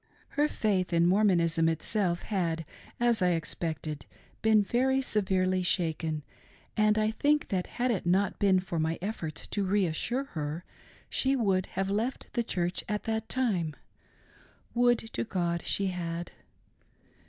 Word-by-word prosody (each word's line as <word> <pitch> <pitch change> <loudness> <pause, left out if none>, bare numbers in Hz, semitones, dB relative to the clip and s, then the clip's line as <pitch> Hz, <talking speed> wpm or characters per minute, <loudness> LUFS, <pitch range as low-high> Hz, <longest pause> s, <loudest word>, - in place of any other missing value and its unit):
Her 295 +1 +2
faith 195 -10 0
in 170 0 +4
Mormonism 170 -4 +3
itself 175 +2 0
had, 165 -5 -1 0.3
as 235 -3 +3
I 180 -1 +4
expected, 160 -2 -3 0.3
been 220 -1 +5
very 260 +5 +2
severely 185 -6 +1
shaken, 160 -4 0 0.5
and 215 0 +3
I 215 0 +2
think 295 +6 +1
that 185 -3 -1
had 250 +1 +2
it 200 - -1
not 190 +3 +1
been 195 -2 +4
for 175 -3 -3
my 160 +1 0
efforts 175 -6 -4
to 205 - -1
re 195 +1 +2
assure 235 +11 -1
her, 155 - -5 0.4
she 265 +1 +1
would 195 -7 +1
have 195 0 0
left 225 +6 -2
the 240 - +1
Church 180 -6 -2
at 210 0 -1
that 220 0 -2
time. 185 - 0 1.0
Would, 245 0 +4 0.2
to - - -1
God, 175 -6 -2
she 195 -1 +1
had. 170 -1 -4
190 Hz, 145 wpm, -29 LUFS, 170-220 Hz, 1.0 s, been